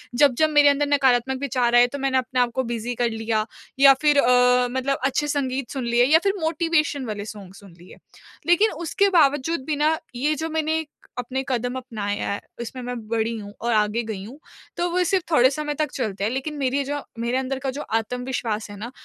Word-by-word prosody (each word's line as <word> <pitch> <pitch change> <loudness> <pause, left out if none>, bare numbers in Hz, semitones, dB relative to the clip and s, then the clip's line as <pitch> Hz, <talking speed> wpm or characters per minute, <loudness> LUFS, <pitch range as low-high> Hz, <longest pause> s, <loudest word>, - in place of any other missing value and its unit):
जब-जब 290 +3 +4
मेरे 295 -1 +6
अंदर 285 +1 +1
नकारात्मक 265 -2 +2
विचार 245 -3 +1
आए 240 0 +7
तो 280 +3 -7
मैंने 260 -1 +1
अपने 255 0 -1
आपको 245 +1 +1
बिज़ी 240 +1 -3
कर 235 - +2
लिया 225 -1 -1 0.3
या 275 0 +9
फिर 295 -2 +4
अ, 250 0 +4
मतलब 260 +2 -1
अच्छे 285 +2 0
संगीत 270 -3 -2
सुन 265 -2 -4
लिए 240 +1 +4
या 310 +5 +5
फिर 395 -1 +2
मोटिवेशन 320 -3 0
वाले 210 -2 -5
सॉन्ग 200 -3 -10
सुन 195 -2 -15
लिए। 175 - -14 0.5
लेकिन 380 +6 +4
उसके 345 +5 0
बावजूद 290 0 +1
भी 305 - 0
ना 315 +1 +3 0.2
ये 290 +5 0
जो 320 +2 -4
मैंने 320 0 0 0.3
अपने 255 +2 -3
कदम 245 0 -1
अपनाया 215 -5 -4
है 200 - -2 0.2
उसमें 250 +2 -6
मैं 245 0 -4
बढ़ी 230 +1 -1
हूँ 205 -1 -9
और 235 - -1
आगे 210 +1 +1
गई 215 -4 -6
हूँ। 245 +8 -11 0.4
तो 350 0 0
वो 360 +1 +2
सिर्फ़ 370 0 +1
थोड़े 255 -4 +5
समय 295 +1 -3
तक 300 -2 -1
चलते 210 -6 -3
हैं 215 - 0
लेकिन 270 +4 -3
मेरी 275 0 0
जो 290 +1 -3 0.2
मेरे 235 +2 -1
अंदर 265 0 -2
का 270 0 -3
जो 295 - -3 0.2
आत्मविश्वास 235 -2 -4
है 205 - -9
ना 230 +4 -7
260 Hz, 210 wpm, -23 LUFS, 235-290 Hz, 0.5 s, या